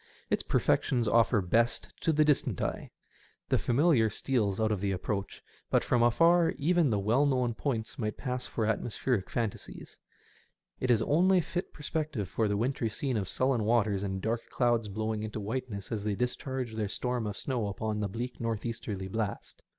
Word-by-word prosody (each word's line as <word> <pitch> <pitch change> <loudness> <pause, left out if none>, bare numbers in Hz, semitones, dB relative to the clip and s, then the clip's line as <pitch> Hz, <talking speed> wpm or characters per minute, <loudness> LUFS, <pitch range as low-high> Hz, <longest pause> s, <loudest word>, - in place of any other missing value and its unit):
Its - - +2
perfections 120 -4 +1
offer 115 -1 +4
best 115 +6 +1
to 165 - +2
the 155 0 +4
distant 150 -2 +1
eye. - - -3 0.6
The - - +3
familiar 125 -3 +3
steals 110 -3 0
out 110 0 +2
to 105 - +2
the 100 0 -1
approach, 100 +1 -3 0.3
but - - +3
from 120 - +2
afar 165 +8 +4
even 170 0 +3
the 105 - +1
well 115 +9 +2
known 125 -3 +1
points 115 -3 -3
might 105 -2 -2
pass 125 -2 -3
for 110 - -2
atmospheric 110 0 -1
phantasies. 115 -4 -5 0.8
It 130 - -1
is 115 -3 +4
the - - 0
only 180 +5 +4
fit 175 +2 -3
perspective 150 - -3
for 110 +3 0
the 100 0 0
wintry 120 0 0
scene 130 +4 -2
of 100 -4 -2
sullen 130 -3 +1
waters 105 -3 +2
and 95 -1 -3
dark 115 +1 -2
clouds 120 -3 +1
blowing 110 +1 -2
into 110 0 -4
whiteness 110 -1 -4
as 105 -3 -2
they 105 -1 -1
discharge 125 +1 -3
their 110 -1 -1
storms 125 0 -2
of 105 - -5
snow 125 -6 -2
upon 105 +2 -3
the 105 -1 -1
bleak 120 +5 -5
north 115 -1 -2
easterly 105 -4 -4
blast. 105 +1 -4
115 Hz, 180 wpm, -30 LUFS, 105-130 Hz, 0.8 s, offer